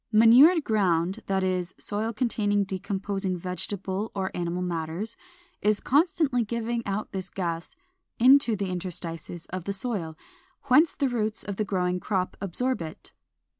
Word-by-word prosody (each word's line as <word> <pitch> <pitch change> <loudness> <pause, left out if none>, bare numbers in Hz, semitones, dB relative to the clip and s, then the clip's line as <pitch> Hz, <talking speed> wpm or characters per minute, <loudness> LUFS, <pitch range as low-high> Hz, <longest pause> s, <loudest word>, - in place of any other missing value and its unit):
Manured 250 +10 +7
ground, 190 -2 +1
that 190 -1 +1
is, 185 -1 -1
soil 215 +2 -2
containing 210 -3 +1
decomposing 195 0 -2
vegetable 190 +3 -4
or 190 -1 -2
animal 175 +1 -2
matters, 170 +5 -3 0.5
is 210 0 +2
constantly 290 -4 +2
giving 235 +1 -2
out 200 +2 -3
this 190 -1 -4
gas 170 -3 -4 0.4
into 255 -1 +6
the 195 -2 -3
interstices 175 -2 -5
of 185 -2 -4
the 200 - -2
soil, 195 -7 -3 0.5
whence 295 +5 +4
the 280 - +1
roots 220 -3 -1
of 200 -2 -5
the 215 - 0
growing 180 -2 0
crop 185 -1 -1
absorb 250 +5 0
it. 160 -1 -7
200 Hz, 140 wpm, -27 LUFS, 180-230 Hz, 0.5 s, Manured